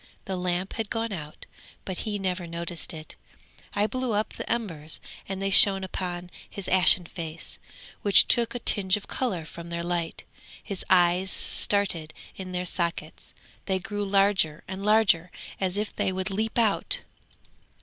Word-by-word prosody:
The 190 - -3
lamp 180 +1 -2
had 220 -3 -3
gone 225 -2 -2
out, 155 -4 -8 0.4
but 185 -2 -4
he 210 -2 -2
never 185 -2 -3
noticed 170 0 -4
it; 155 -1 -10 0.6
I 205 0 +2
blew 255 +2 -2
up 210 +1 -1
the - - -6
embers 165 -10 -3 0.3
and 195 -1 -4
they 195 0 -1
shone 195 -1 +10
upon 180 -1 -5 0.2
his 200 - -6
ashen 185 -1 +4
face, 165 -1 -7 0.4
which 200 -1 +6
took 235 +1 +4
a - - 0
tinge 200 -5 +2
of 205 - -11
colour 190 -11 -2
from 170 +2 -10
their 170 0 -4
light; 170 -1 -3 0.4
his 200 -3 -4
eyes 180 +1 +3
started 175 -8 +1 0.2
in 185 -1 -7
their 180 0 -3
sockets, 170 -3 -1 0.3
they 190 -1 +1
grew 205 +2 -4
larger 195 -6 +2
and 190 +1 -6
larger, 205 -5 +3 0.3
as 190 0 -1
if 210 0 -3
they - - 0
would 185 +1 -2
leap 220 +4 -2
out. 220 -4 +1
190 Hz, 160 wpm, -26 LUFS, 175-205 Hz, 0.6 s, shone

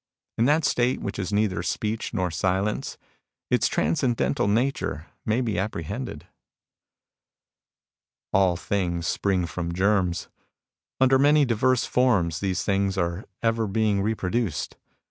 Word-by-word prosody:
In 115 - +4
that 150 +3 +3
state 125 +1 +1
which 100 0 -5
is 95 +1 -3
neither 100 -4 +1
speech 105 +4 -2
nor 95 -5 -1
silence, 95 +4 -1 0.5
its - - +3
transcendental 115 - +1
nature 110 - 0 0.2
may 110 +4 +2
be 110 -7 -1
apprehended." 95 -6 -4 2.1
All 95 -3 +3
things 85 -3 -2
spring 95 -1 0
from 85 0 -4
germs. 95 -2 +1 0.7
Under 130 0 +5
many 145 +1 +5
diverse 125 +1 +2
forms 100 -11 +2
these 95 -2 -1
things 95 -1 0
are 85 +2 -1 0.2
ever 115 -1 +1
being 105 0 +1
repro 100 -3 -1
duced. 110 -11 -1
100 Hz, 125 wpm, -25 LUFS, 90-115 Hz, 2.1 s, Under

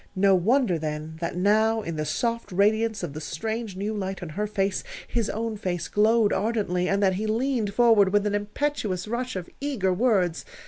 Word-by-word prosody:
No 195 +1 +4
wonder 195 0 +2
then, 155 +1 -5
that 170 0 -3
now, 220 +3 +3
in 165 - -4
the 155 0 -2
soft 230 +8 -2
radiance 215 +2 +2
of 160 -5 -4
the 155 - -6
strange, 220 +5 -4
new 205 +3 -3
light 195 -2 -4
on 175 - -6
her 210 +7 -2
face, 195 -2 -1 0.2
his 230 -3 -1
own 225 0 -3
face 175 -5 -3
glowed 215 0 +3
ardently, 195 -3 0
and 200 +1 +1
that 190 -1 +4
he 215 +2 -2
leaned 225 -2 0
forward 225 -5 +5
with 205 0 +2
an 205 - 0
impetuous 205 -2 -2
rush 245 +2 -3
of 180 -2 -4
eager 240 -10 0
words. 185 -5 +1
205 Hz, 190 wpm, -25 LUFS, 185-225 Hz, 0.2 s, forward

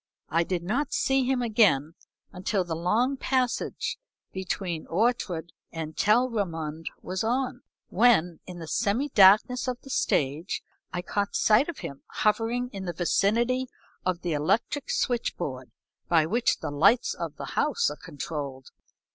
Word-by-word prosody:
I 165 +1 +2
did 175 0 -2
not 260 +10 -1
see 270 -1 +2
him 255 -1 +1
again 205 - +3 0.4
until 190 +1 -1
the 170 -2 -4
long 225 +11 +1
passage 255 - -1 0.3
between 185 -3 -4
Ortrud 180 -4 0 0.2
and 160 -1 -6
Telrammund 195 -9 0 0.2
was 185 +2 -3
on, 250 +2 -1 0.3
when, 180 -7 +3
in 180 -1 -8
the 165 - -7
semi 235 - 0
darkness 215 +6 +5
of 250 -1 -2
the 270 - -10
stage, 150 - 0 0.3
I 175 0 -3
caught 200 +2 -2
sight 220 +9 +4
of 340 - -5
him 140 0 -7
hovering 230 +3 0
in 195 -1 -5
the 175 - -3
vicinity 230 +9 +1 0.4
of 180 -1 -1
the 175 -2 -1
electric 195 - 0
switch 240 -2 0
board 130 -6 -5 0.4
by 165 -3 +4
which 230 +9 +1
the - - -3
lights 195 - +4
of - - -5
the - - -7
house 465 - +1
are - - -6
controlled. 140 -3 -6
195 Hz, 145 wpm, -27 LUFS, 165-245 Hz, 0.4 s, darkness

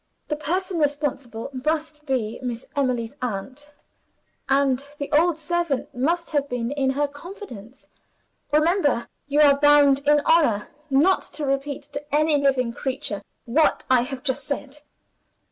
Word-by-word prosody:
The 300 - 0
person 355 +4 -2
responsible 280 -5 -2
must 305 -1 -2
be 235 -5 -1
Miss 245 -2 -4
Emily's 255 -3 -1
aunt 255 +6 -5 0.8
and 270 -1 +2
the 285 - -5
old 325 +1 +3
servant 320 -3 -2
must 335 +7 0
have 285 -2 0
been 245 0 -2
in 275 -2 0
her 285 +2 +1
confidence. 285 - -11 0.6
Remember! 305 -4 +2 0.2
You 290 +1 +3
are 280 -1 +6
bound 290 -2 +6
in 295 0 +5
honor 285 -11 +3 0.2
not 300 +8 +4
to 300 - -3
repeat 275 +1 -2
to 285 +1 -4
any 305 -1 +3
living 255 -4 +2
creature 245 -6 -3 0.2
what 300 +7 +2
I 255 -2 +6
have 255 +1 -5
just 270 -1 -2
said." 280 0 -5
285 Hz, 140 wpm, -24 LUFS, 255-300 Hz, 0.8 s, are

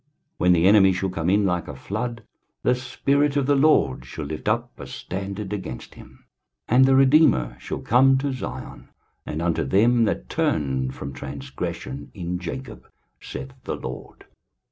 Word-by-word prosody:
When 90 0 +5
the 85 0 +3
enemy 95 -1 +6
shall 95 +1 -2
come 85 -1 -1
in 100 +1 +3
like 90 -2 0
a 75 - -7
flood, 115 - -4 0.4
the 125 - +4
Spirit 140 +3 0
of 140 - +2
the 145 - +3
LORD 135 - +3
shall 75 +4 -7
lift 75 +1 -6
up - - 0
a - - -7
standard 100 +2 -5
against 65 -12 -6
him. 65 0 -16 0.4
23:059:020 120 - +2
And 130 +1 +7
the 135 0 +4
Redeemer 130 - +4
shall - - -5
come 130 +3 +4
to 135 0 -1
Zion, 130 - -7 0.4
and 80 +2 -3
unto 85 -1 +1
them 115 - +3
that 60 - -2
turn 65 -3 0
from 70 +1 -7
transgression 70 0 -6
in 90 -1 -3
Jacob, 110 +7 -7 0.3
saith 65 -1 -7
the - - -2
LORD. - - -8
95 Hz, 165 wpm, -24 LUFS, -, 0.4 s, And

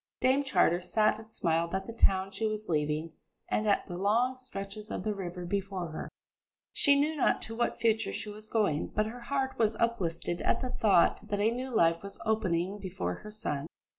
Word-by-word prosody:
Dame 265 +2 +3
Charter 180 -10 +3
sat 215 +4 +2
and 220 0 -13
smiled 170 -2 0
at 190 - -2
the 230 - -7
town 195 -3 +2
she 220 +3 -1
was 215 0 -4
leaving 155 0 0 0.4
and 215 - 0
at 200 - +3
the 175 -1 -6
long 230 +6 +3
stretches 215 -5 -7
of - - -4
the 215 - 0
river 180 -2 -5
before 190 -2 -2
her. 155 - -6 0.6
She 280 0 +5
knew 305 +2 +1
not 290 - +2
to 225 - -5
what 240 +1 0
future 225 -1 +2
she - - -4
was 210 +1 -8
going, 205 -10 +1
but 215 - 0
her 230 +3 -6
heart 265 +1 -2
was 220 -1 +3
uplifted 175 -7 -1
at - - +2
the 255 -1 -2
thought 200 -7 +3
that 205 - -1
a 215 +2 +3
new 255 +2 -3
life 170 -8 +3
was 200 0 -8
opening 200 -3 0
before 130 - -3
her 210 - -9
son. 160 -9 -3
210 Hz, 200 wpm, -30 LUFS, 175-225 Hz, 0.6 s, She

